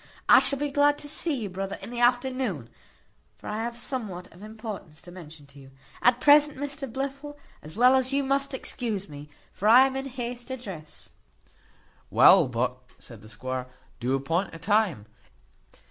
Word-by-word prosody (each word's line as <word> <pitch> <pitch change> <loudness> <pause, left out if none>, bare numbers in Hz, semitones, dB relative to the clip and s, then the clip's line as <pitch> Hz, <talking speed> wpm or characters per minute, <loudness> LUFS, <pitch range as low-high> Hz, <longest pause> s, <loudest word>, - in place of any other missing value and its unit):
I - - +8
shall 280 - +3
be 290 +1 -3
glad 290 +1 +3
to 295 - -7
see 305 +1 +1
you, 215 - -4
brother, 195 +1 -5
in - - -8
the 240 - -5
afternoon; 245 - 0 0.7
for - - -18
I 210 +1 -3
have 235 +1 -4
somewhat 215 -8 -5
of 175 - -17
importance 215 -7 -9
to 175 - -12
mention 160 -4 -12
to 140 0 -17
you. 135 -1 -14 0.3
At 245 0 +4
present, 295 +1 +5
Mr 280 -2 -5
Blifil, 275 +3 -5 0.2
as 155 +3 -12
well 250 +3 +5
as 260 0 +1
you, 280 0 +1
must 275 0 -1
excuse 220 -7 -4
me; 145 -1 -11 0.2
for 205 - -2
I 250 +4 +8
am 265 0 -3
in 270 0 -4
haste 245 -1 -6
to 260 -1 -5
dress." 170 -10 -11 1.0
"Well, - - +6
but," 125 +1 -2 0.2
said 115 -4 -14
the 110 - -14
squire, 130 +4 -5 0.3
"do 125 +2 0
appoint 165 +7 -2
a - - -7
time." 190 - 0
225 Hz, 180 wpm, -26 LUFS, 160-265 Hz, 1.0 s, I